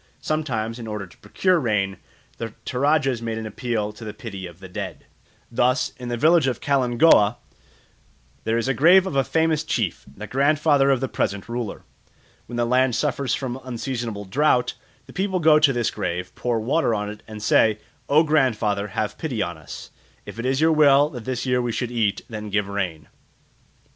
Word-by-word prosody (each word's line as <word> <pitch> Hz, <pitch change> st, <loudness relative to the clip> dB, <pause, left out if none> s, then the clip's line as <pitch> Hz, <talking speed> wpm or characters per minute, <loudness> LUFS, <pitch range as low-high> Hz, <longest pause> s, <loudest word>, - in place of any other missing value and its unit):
Sometimes, 120 Hz, -7 st, -2 dB
in 115 Hz, -, -7 dB
order 105 Hz, -2 st, -4 dB
to 90 Hz, -, -19 dB
procure 185 Hz, -2 st, +1 dB
rain, 105 Hz, -7 st, 0 dB, 0.4 s
the 115 Hz, -1 st, -6 dB
Toradjas 135 Hz, -2 st, +1 dB
make 115 Hz, -1 st, -3 dB
an 110 Hz, -, -5 dB
appeal 110 Hz, -1 st, -3 dB
to 110 Hz, -, -12 dB
the 105 Hz, -1 st, -7 dB
pity 100 Hz, -6 st, -7 dB
of 85 Hz, 0 st, -14 dB
the 95 Hz, -, -10 dB
dead. 90 Hz, -, -6 dB, 0.5 s
Thus, 125 Hz, +4 st, +1 dB
in 125 Hz, -1 st, -7 dB
the 120 Hz, -, -2 dB
village 160 Hz, +2 st, +4 dB
of 130 Hz, -, -1 dB
Kalingooa, 125 Hz, -4 st, +4 dB, 1.1 s
there 115 Hz, +1 st, 0 dB
is 115 Hz, -, -1 dB
the 135 Hz, -, +1 dB
grave 180 Hz, +7 st, +6 dB
of 190 Hz, -, -4 dB
a 135 Hz, -, +3 dB
famous 160 Hz, +1 st, +1 dB
chief, 115 Hz, -, -2 dB
the 105 Hz, -, -6 dB
grandfather 145 Hz, +2 st, +3 dB
of 135 Hz, -2 st, +2 dB
the 135 Hz, -, 0 dB
present 100 Hz, -5 st, -2 dB
ruler. 120 Hz, -2 st, -5 dB, 0.6 s
When 120 Hz, -, -7 dB
the 120 Hz, 0 st, +1 dB
land 125 Hz, 0 st, +2 dB
suffers 140 Hz, -3 st, 0 dB
from 130 Hz, -1 st, -5 dB
unseasonable 120 Hz, -4 st, -4 dB
drought, 125 Hz, +4 st, +2 dB, 0.3 s
the -, -, -14 dB
people 190 Hz, 0 st, -1 dB
go 155 Hz, -2 st, +6 dB
to 150 Hz, -2 st, +5 dB
this 120 Hz, -3 st, 0 dB
grave, 90 Hz, -3 st, -4 dB
pour 120 Hz, -2 st, -1 dB
water 120 Hz, +1 st, +1 dB
on 105 Hz, 0 st, -2 dB
it, 105 Hz, -, -11 dB
and 110 Hz, -1 st, -8 dB
say, 110 Hz, 0 st, +4 dB, 0.3 s
"O 150 Hz, +3 st, +5 dB
grandfather, 115 Hz, -9 st, +1 dB
have 105 Hz, -1 st, -2 dB
pity 130 Hz, -9 st, -2 dB
on 85 Hz, -, -4 dB
us; 80 Hz, -1 st, -10 dB, 0.3 s
if -, -, -9 dB
it 120 Hz, -, -2 dB
is 130 Hz, +1 st, +1 dB
your 160 Hz, +1 st, +4 dB
will 145 Hz, -2 st, +5 dB
that 120 Hz, -4 st, -8 dB
this 130 Hz, -1 st, -3 dB
year 125 Hz, -1 st, +1 dB
we 120 Hz, -1 st, -2 dB
should 120 Hz, +1 st, -3 dB
eat, 110 Hz, -4 st, 0 dB
then 105 Hz, -3 st, -6 dB
give 105 Hz, 0 st, 0 dB
rain." 90 Hz, -6 st, -3 dB
120 Hz, 190 wpm, -23 LUFS, 105-140 Hz, 1.1 s, grave